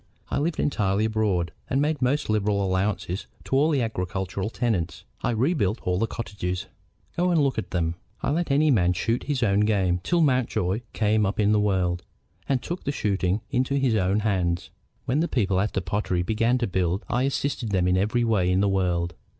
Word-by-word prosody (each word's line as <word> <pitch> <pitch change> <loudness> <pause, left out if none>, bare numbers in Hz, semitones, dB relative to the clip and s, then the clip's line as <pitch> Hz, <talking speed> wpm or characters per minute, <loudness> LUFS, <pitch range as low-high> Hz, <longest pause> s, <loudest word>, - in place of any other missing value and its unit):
I - - 0
lived 160 +2 -1
entirely 105 -6 +1
abroad, 105 -7 0 0.2
and 135 - +1
made 150 0 0
most 135 +4 +1
liberal 105 -2 +1
allowances 95 0 -1 0.2
to - - -2
all 145 +4 +4
the 140 -6 +2
agricultural 95 -1 -3
tenants. 90 - -2 0.2
I - - 0
rebuilt 120 - +1
all 90 0 0
the 115 - +1
cottages; 90 -6 -4 0.5
go 180 +1 +1
and 170 -2 +3
look 140 -5 +1
at - - -6
them. 85 -2 0 0.3
I - - +1
let 170 +2 0
any 145 +2 +4
man 90 -7 +3
shoot 115 +6 -1
his 140 -4 -1
own 100 -2 +3
game 95 -4 +2
till 170 - +1
Mountjoy 120 - +1
came 110 0 +2
up 100 +1 -1
in 105 0 +3
the 105 - +4
world 90 -4 +1 0.5
and 130 -3 +1
took 175 +2 -5
the 140 - -1
shooting 100 -5 0
into 130 +1 +1
his 135 -4 +2
own 100 0 +2
hands. 90 -5 0 0.3
When 130 +5 +1
the 170 - +1
people 100 - +1
at 105 +3 0
the 95 - 0
pottery 95 -2 -1
began 115 +5 +1
to 120 - 0
build 95 0 -1
I 120 - 0
assisted 135 -3 -1
them 95 -3 +1
in 90 - +3
every 105 +6 +1
way 105 -6 +2
in 90 - +2
the 100 - +3
world. 90 -3 0
105 Hz, 200 wpm, -25 LUFS, 95-125 Hz, 0.5 s, all